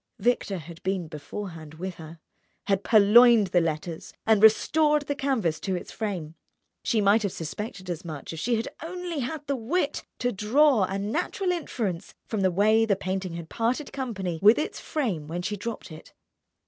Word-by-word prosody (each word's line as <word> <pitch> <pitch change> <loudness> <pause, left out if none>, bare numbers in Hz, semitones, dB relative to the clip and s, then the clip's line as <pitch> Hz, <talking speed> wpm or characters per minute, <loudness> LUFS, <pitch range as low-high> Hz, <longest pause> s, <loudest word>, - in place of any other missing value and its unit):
Victor 215 -3 0
had 170 +1 -10
been 190 -3 -2
beforehand 160 0 -8
with 185 +3 -5
her, 160 +1 -10 0.5
had 195 -1 +1
purloined 220 0 +6
the 175 -1 +3
letters 160 0 -4
and 220 -2 +4
restored 300 +7 +4
the 285 - -2
canvas 260 - 0
to 190 -2 -2
its 180 - -6
frame. 185 -8 -4 0.5
She 225 -3 +1
might 205 +3 +4
have 200 -3 -1
suspected 190 +5 -6
as 175 -2 -4
much 155 -3 -7
if 160 - -6
she 240 +8 +1
had 225 +1 -2
only 350 -1 -4
had 290 +4 -4
the 280 0 -1
wit 265 +10 -1
to 245 0 0
draw 225 +2 +3
a 195 +1 -3
natural 345 - -1
inference 215 - -3
from 215 -3 -2
the 190 - +4
way 215 +5 +4
the 215 -3 +2
painting 190 -1 -3
had 170 -1 -6
parted 240 - -2
company 195 -11 -3
with 210 +3 +7
its 300 - -3
frame 205 - -2
when 175 +3 -4
she 210 +3 -2
dropped 215 -2 -6
it. 155 +1 -12
205 Hz, 180 wpm, -26 LUFS, 175-245 Hz, 0.5 s, with